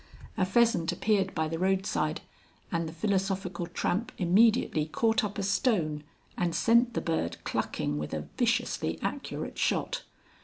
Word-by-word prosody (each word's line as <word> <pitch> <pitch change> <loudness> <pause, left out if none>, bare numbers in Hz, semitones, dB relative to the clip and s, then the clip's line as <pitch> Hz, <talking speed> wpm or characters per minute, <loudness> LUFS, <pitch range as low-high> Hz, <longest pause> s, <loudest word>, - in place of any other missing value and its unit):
A 185 -3 +1
pheasant 230 -4 +3
appeared 200 -3 +1
by 160 0 0
the 165 +1 -3
roadside, 185 -4 0 0.5
and 165 -2 -1
the - - -7
Philosophical 190 -1 -1
Tramp 180 +5 -1
immediately 185 -4 +3
caught 225 +9 +1
up 205 0 -3
a 200 - -1
stone 185 - +1 0.3
and 170 -2 -1
sent 235 +7 +3
the - - 0
bird 160 - -1
clucking 75 0 -2
with 75 - -4
a - - -5
viciously - - 0
accurate - - -4
shot. - - 0
185 Hz, 145 wpm, -29 LUFS, 165-215 Hz, 0.5 s, pheasant